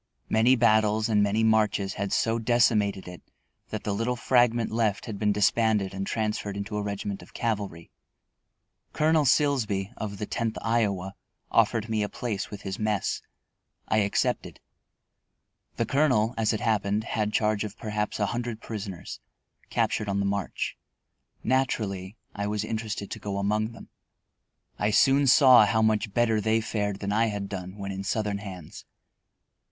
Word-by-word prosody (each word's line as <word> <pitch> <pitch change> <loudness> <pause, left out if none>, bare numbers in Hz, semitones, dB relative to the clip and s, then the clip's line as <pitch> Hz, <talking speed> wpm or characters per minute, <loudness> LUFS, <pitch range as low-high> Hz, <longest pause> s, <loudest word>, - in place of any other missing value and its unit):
Many 115 +4 +4
battles 110 -2 +3
and 105 -2 +3
many 105 +2 +2
marches 105 -3 +2
had 100 -1 -3
so 115 0 +1
decimated 110 -5 +2
it 90 -1 -9 0.5
that 110 - -5
the 105 - -1
little 115 +4 -1
fragment 120 -1 +2
left 110 -3 0
had 105 -4 -6
been 105 -1 +2
disbanded 105 -1 +2
and 95 0 -4
transferred 105 -2 -2
into 100 +1 -5
a 105 - -1
regiment 100 -1 -4
of - - -16
cavalry. 100 -8 -3 1.0
Colonel 155 0 +3
Silsby, 120 -8 +1
of 100 -2 -5
the 105 - -3
Tenth 115 +1 -2
Iowa, 100 -5 0 0.4
offered 115 0 +2
me 110 -2 0
a 105 - -1
place 105 -5 -4
with 105 - -9
his 95 -1 -5
mess. 105 -2 -1 0.7
I 110 - +2
accepted. 100 -1 -1 1.2
The - - 0
Colonel, 130 -6 +2
as 110 -1 +1
it 110 - -2
happened, 105 -2 +1
had 105 -2 -1
charge 105 -1 +1
of 105 -1 -7
perhaps 105 -1 -3
a 105 - +2
hundred 120 +1 -3
prisoners, 100 -6 -7 0.5
captured 105 - 0
on 100 0 0
the 100 - 0
march. 100 -2 -2 0.7
Naturally, 110 -6 -1 0.2
I 100 0 -3
was 105 0 -1
interested 110 -2 -4
to 110 - -5
go 100 -1 -4
among 105 +3 0
them. 115 - -13 0.9
I 105 - +2
soon 135 +6 +4
saw 125 -4 +7
how 110 +2 +2
much 110 -1 +1
better 115 -1 +2
they 110 +1 +2
fared 105 -3 -2
than 100 0 -2
I 115 +2 +2
had 100 -2 -3
done 95 0 -7
when 100 -1 -5
in 95 0 -5
Southern 105 0 -1
hands. 95 -6 -9
105 Hz, 160 wpm, -27 LUFS, 100-115 Hz, 1.2 s, saw